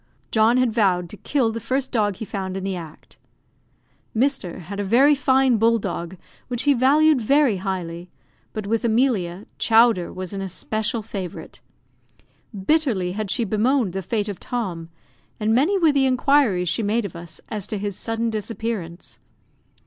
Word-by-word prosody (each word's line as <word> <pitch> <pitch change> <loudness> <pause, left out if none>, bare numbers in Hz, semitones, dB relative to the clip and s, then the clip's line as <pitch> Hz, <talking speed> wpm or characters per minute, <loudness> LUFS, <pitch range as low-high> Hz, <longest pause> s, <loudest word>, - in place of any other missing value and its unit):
John 225 +2 +4
had 255 -3 +2
vowed 185 -6 +1
to 210 - -8
kill 255 -2 0
the 230 - -4
first 260 +4 -2
dog 210 -5 +1
he 220 - -6
found 190 -2 -4
in 190 - -5
the 195 -1 -2
act. 165 -3 -11 1.0
Mr. 245 -9 0
had 200 +4 -7
a - - 0
very 255 +9 +5
fine 265 -2 +3
bull 230 +2 +3
dog, 175 -3 -5 0.3
which 245 -2 -2
he 290 - +4
valued 280 +2 +4
very 275 -2 +3
highly; 180 -2 -4 0.4
but 215 -2 -5
with 225 +3 0
Emilia, 220 -6 +1
Chowder 225 -5 +4
was 185 +1 -7
an 195 - -4
especial 215 +4 -2
favourite. 185 -6 -7 1.1
Bitterly 245 - +1
had 210 +1 -4
she 235 +4 +1
bemoaned 220 0 +1
the 195 - -3
fate 210 +3 -2
of 200 -4 -5
Tom, 180 -9 -4 0.5
and 215 +1 +1
many 305 - +3
were 330 -5 +4
the 275 -2 +3
inquiries 255 -8 +2
she 170 +7 0
made 215 +2 0
of 185 - -7
us 170 -2 -9
as 210 -2 -4
to 215 - -3
his 200 -1 -3
sudden 225 +2 -2
disappearance. 215 -5 -5
215 Hz, 165 wpm, -22 LUFS, 190-250 Hz, 1.1 s, very